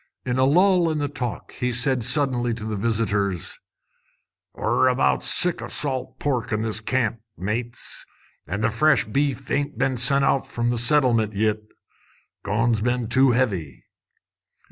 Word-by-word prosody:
In 125 0 -2
a 130 - +4
lull 180 +3 +3
in 155 - -2
the 145 -1 -1
talk 130 -6 -6
he 125 0 -3
said 125 0 0
suddenly 125 -2 +1
to 110 -2 -8
the 110 -1 -4
visitors 100 -4 -2 1.0
"We're - - +1
about 130 +1 +1
sick 180 -1 +6
o' - - -6
salt 130 -3 -1
pork 130 -5 -2
in 110 0 -1
this 110 -1 0
camp, 115 0 -2 0.2
mates, 115 +6 -3 0.4
an' 100 +7 -4
the 115 +1 +1
fresh 135 +3 +2
beef 135 +3 -2
ain't 145 +1 -2
been 130 -2 -1
sent 135 +3 +3
out 135 - 0
from 120 0 -2
the 120 - -1
Settlement 120 -4 +2
yit. 110 +1 0 0.8
Coin's 115 +2 0
been 120 0 -1
too 130 +2 +4
heavy. 100 - -2
120 Hz, 155 wpm, -22 LUFS, 110-135 Hz, 1.0 s, sick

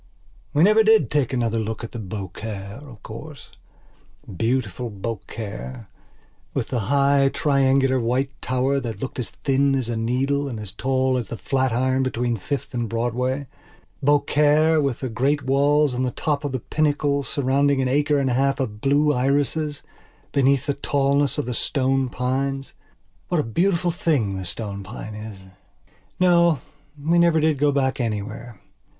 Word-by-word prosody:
We 150 - +3
never 215 +3 +6
did 220 0 +4
take 145 -4 +1
another 115 -3 0
look 110 +1 -4
at 115 - -6 0.2
Beaucaire, 100 +2 -6
of 125 -9 -13
coursebeautiful 120 - -6
Beaucaire, 110 +2 -6 0.7
with - - -1
the 125 - -1
high, 140 -1 +4
triangular 135 -2 +2
white 125 +4 0
tower, 130 +2 +1
that 115 -6 -5
looked 130 +1 -5
as 115 -6 -3
thin 135 0 +1
as 130 -3 -1
a 120 - -1
needle 135 +5 0
and 115 -4 -5
as 105 -3 -7
tall 130 +4 0
as 120 - -5
the 115 - -6
Flatiron, 130 0 +1
between 120 -2 0
Fifth 135 +10 -4
and 120 -2 -2
BroadwayBeaucaire 145 +5 +1
with 140 -4 -1
the 130 - -2
grey 135 +6 +1
walls 140 +1 +3
on 125 - -2
the 130 - +1
top 145 +4 -2
of 145 - -2
the 130 - -2
pinnacle 145 -1 +1
surrounding 140 0 +1
an 130 - +1
acre 145 +3 +2
and 135 -2 +1
a - - +1
half 135 +2 +1
of 105 -5 -3
blue 145 +2 +3
irises, 145 +3 0 0.5
beneath 140 -1 +2
the 145 - 0
tallness 140 0 +1
of 145 - -1
the 125 - -3
stone 135 +1 0
pines, 135 +2 -2 0.5
What 175 - +1
a - - +2
beautiful 175 - +1
thing 150 - 0
the 95 -1 -5
stone 100 +3 -5
pine 105 +2 -8
is!... 105 -1 -8 0.8
No, 170 -4 +4 0.4
we 165 +4 +2
never 170 -2 +4
did 155 -2 +2
go 145 0 +3
back 135 -2 0
anywhere. 110 0 -4
135 Hz, 155 wpm, -23 LUFS, 115-145 Hz, 0.8 s, never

